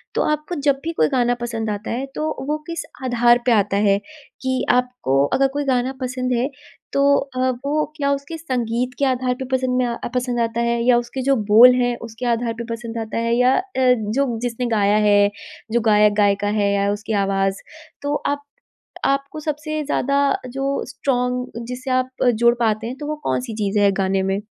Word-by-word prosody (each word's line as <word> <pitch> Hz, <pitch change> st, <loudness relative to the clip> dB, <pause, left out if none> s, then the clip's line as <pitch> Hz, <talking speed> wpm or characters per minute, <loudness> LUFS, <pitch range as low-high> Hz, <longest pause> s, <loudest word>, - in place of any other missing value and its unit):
तो -, -, +2 dB
आपको 305 Hz, +4 st, -3 dB
जब 275 Hz, -1 st, +3 dB
भी 330 Hz, -, -2 dB
कोई -, -, +2 dB
गाना 245 Hz, -3 st, +1 dB
पसंद 225 Hz, -2 st, -3 dB
आता 205 Hz, 0 st, -4 dB
है 255 Hz, +4 st, -2 dB
तो 310 Hz, +1 st, -1 dB, 0.2 s
वो 300 Hz, +1 st, 0 dB
किस 335 Hz, -2 st, -4 dB, 0.2 s
आधार 240 Hz, -1 st, +4 dB
पे 245 Hz, -, +3 dB
आता 205 Hz, -2 st, +2 dB
है? 200 Hz, -1 st, +3 dB, 0.4 s
कि 260 Hz, -1 st, -1 dB
आपको 250 Hz, -, +1 dB
अगर 275 Hz, 0 st, +4 dB
कोई 290 Hz, -, -1 dB
गाना 260 Hz, 0 st, +1 dB
पसंद 255 Hz, 0 st, -2 dB
है 245 Hz, +4 st, 0 dB, 0.4 s
तो 275 Hz, -, +2 dB, 0.2 s
अ, 260 Hz, -2 st, -1 dB, 0.2 s
वो 300 Hz, +2 st, +1 dB
क्या 280 Hz, -2 st, +1 dB
उसके 280 Hz, +4 st, -5 dB
संगीत 250 Hz, -4 st, -2 dB
के 280 Hz, -, +3 dB
आधार 255 Hz, -1 st, +1 dB
पे 265 Hz, -, -3 dB
पसंद 255 Hz, -1 st, +1 dB
में 255 Hz, -, +2 dB
आ 235 Hz, -1 st, -2 dB, 0.2 s
पसंद 245 Hz, -1 st, -1 dB
आता 230 Hz, 0 st, 0 dB
है? 235 Hz, 0 st, 0 dB
या 245 Hz, -, +6 dB
उसके 240 Hz, +2 st, -3 dB
जो 275 Hz, +1 st, +2 dB, 0.2 s
बोल 250 Hz, +3 st, +9 dB
है 245 Hz, 0 st, +1 dB
उसके 230 Hz, +1 st, -7 dB
आधार 230 Hz, 0 st, -1 dB
पर 235 Hz, +1 st, -6 dB
पसंद 230 Hz, 0 st, -7 dB
आता 225 Hz, 0 st, -4 dB
है? 230 Hz, 0 st, 0 dB
या 250 Hz, +1 st, +4 dB
अ, -, -, +2 dB, 0.5 s
जो 260 Hz, -5 st, 0 dB
जिसने 245 Hz, 0 st, -2 dB
गाया 205 Hz, 0 st, +3 dB
है, 205 Hz, 0 st, +5 dB, 0.4 s
जो 235 Hz, 0 st, +2 dB
गायक-गायिका 205 Hz, -1 st, +3 dB
है 200 Hz, 0 st, +2 dB
या 200 Hz, 0 st, +1 dB
उसकी 215 Hz, +2 st, -4 dB
आवाज़? 195 Hz, 0 st, 0 dB, 0.4 s
तो 290 Hz, +1 st, -1 dB
आप 285 Hz, 0 st, -1 dB, 0.6 s
आपको 275 Hz, +2 st, -1 dB
सबसे 305 Hz, 0 st, -3 dB
ज़्यादा 280 Hz, -1 st, 0 dB, 0.3 s
जो 270 Hz, +1 st, -4 dB, 0.2 s
स्ट्रॉंग 250 Hz, -3 st, -2 dB
जिससे 255 Hz, +2 st, -5 dB
आप 255 Hz, 0 st, +1 dB, 0.3 s
जुड़ 235 Hz, 0 st, +6 dB
पाते 220 Hz, -1 st, 0 dB
हैं 255 Hz, -, -5 dB
तो 295 Hz, -, -7 dB
वो 305 Hz, -, -2 dB
कौन-सी 250 Hz, -2 st, -2 dB
चीज़ 210 Hz, -1 st, 0 dB
है 200 Hz, -1 st, +4 dB
गाने 195 Hz, 0 st, 0 dB
में? 195 Hz, +1 st, -1 dB
245 Hz, 195 wpm, -21 LUFS, 225-265 Hz, 0.6 s, बोल